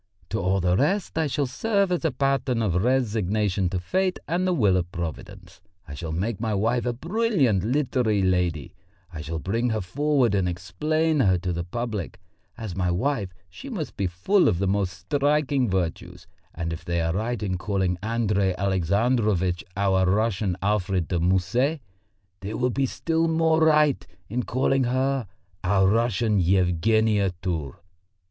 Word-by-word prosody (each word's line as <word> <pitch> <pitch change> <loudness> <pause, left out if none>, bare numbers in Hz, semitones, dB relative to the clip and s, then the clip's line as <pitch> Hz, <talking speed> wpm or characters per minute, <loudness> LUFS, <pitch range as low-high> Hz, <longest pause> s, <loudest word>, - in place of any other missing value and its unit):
To 110 - -2
all 95 +2 +1
the 90 0 +2
rest 185 - 0
I 160 -1 +1
shall 140 +1 0
serve 200 - 0
as 175 - 0
a 160 - +2
pattern 135 -3 0
of 90 -3 +1
resignation 105 -6 +1
to 90 0 -2
fate 185 - 0
and 180 +2 0
the - - +2
will 105 - +3
of 90 -1 -1
Providence. 85 0 -7 0.3
I 75 - -8
shall 80 +3 -5
make 100 +6 -2
my 110 -3 -1
wife 115 +5 0
a 120 - 0
brilliant 160 - +1
literary 120 -4 +1
lady; 90 -4 0 0.4
I 75 - -6
shall 80 +2 -4
bring 115 +9 -1
her 110 -1 0
forward 135 +3 +1
and 95 -3 +1
explain 155 - -1
her 95 -8 +4
to 90 0 -3
the 85 0 -3
public; 105 -1 -4 0.4
as 110 -7 -6
my 90 -1 0
wife 105 +3 -1 0.2
she 275 - -10
must 165 - -5
be 95 - -1
full 95 - +2
of 85 - +2
the 100 - 0
most 95 -1 0
striking 140 +3 +1
virtues; 90 -3 -3 0.3
and 85 0 -3
if 85 +2 -7
they 85 0 -1
are 80 0 0
right 110 +3 -2
in 95 -3 -2
calling 95 -3 -1
Andrey 105 -4 0
Alexandrovitch 100 -1 +1
our 95 -2 +2
Russian 100 -2 0
Alfred 95 -4 0
de 90 - 0
Musset, 95 - +1 0.6
they 100 +3 -5
will 125 0 0
be 135 +2 0
still 165 +5 0
more 160 0 +2
right 150 -3 +4 0.3
in 120 +4 -1
calling 130 +1 +1
her 130 -1 0 0.4
our 95 +1 +3
Russian 115 0 +2
Yevgenia 95 +3 +2
Tour." 85 -2 -4
105 Hz, 165 wpm, -25 LUFS, 90-130 Hz, 0.6 s, her